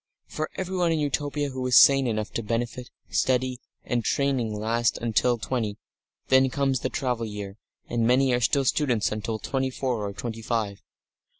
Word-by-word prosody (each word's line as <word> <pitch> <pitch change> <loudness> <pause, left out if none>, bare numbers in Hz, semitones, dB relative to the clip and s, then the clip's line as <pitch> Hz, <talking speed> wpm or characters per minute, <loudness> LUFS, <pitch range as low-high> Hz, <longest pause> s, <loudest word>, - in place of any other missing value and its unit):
For 155 0 -4
everyone 180 -2 0
in 165 - +1
Utopia 145 0 -1
who 130 -1 -5
is 125 - +5
sane 135 -2 +7
enough 110 -2 -2
to - - -2
benefit, 120 +2 -3 0.2
study 130 -1 +1 0.3
and 120 -1 -1
training 130 -3 0
last 115 +3 0
until 120 +1 +1
twenty; 110 -2 -2 0.5
then 130 0 +5
comes 135 -1 0
the 130 - -2
travel 125 -4 -2
year, 105 -1 -7 0.3
and 115 -1 0
many 130 +1 +3
are 120 - +1
still 135 +3 +2
students 125 -6 +1
until 110 +1 -3
twenty 130 +3 -2
four 125 -4 -2
or 100 - -3
twenty 115 +3 -6
five. 110 -4 -2
125 Hz, 170 wpm, -26 LUFS, 115-135 Hz, 0.5 s, sane